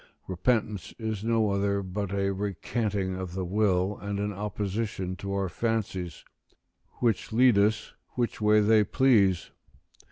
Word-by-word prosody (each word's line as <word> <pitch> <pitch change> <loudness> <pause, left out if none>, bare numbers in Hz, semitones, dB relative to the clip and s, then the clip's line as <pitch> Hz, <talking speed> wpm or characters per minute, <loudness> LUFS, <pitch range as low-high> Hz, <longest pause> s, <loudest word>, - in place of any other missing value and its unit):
Repentance 105 -1 -1
is 110 -3 -3
no 115 -2 +2
other 100 0 0
but 95 +1 -4
a 100 0 0
recanting 100 0 -2
of 95 -1 -5
the 95 -1 -2
will 95 0 +1
and 100 0 -3
an 105 0 -2
opposition 100 -1 -3
to 100 +2 -5
our 100 -1 0
fancies, 95 -5 -3 0.7
which 115 -5 -1
lead 120 +1 +5
us 105 +2 +1 0.2
which 120 -3 -2
way 105 0 +5
they 110 0 +5
please. 100 - +3
100 Hz, 135 wpm, -28 LUFS, 95-110 Hz, 0.7 s, lead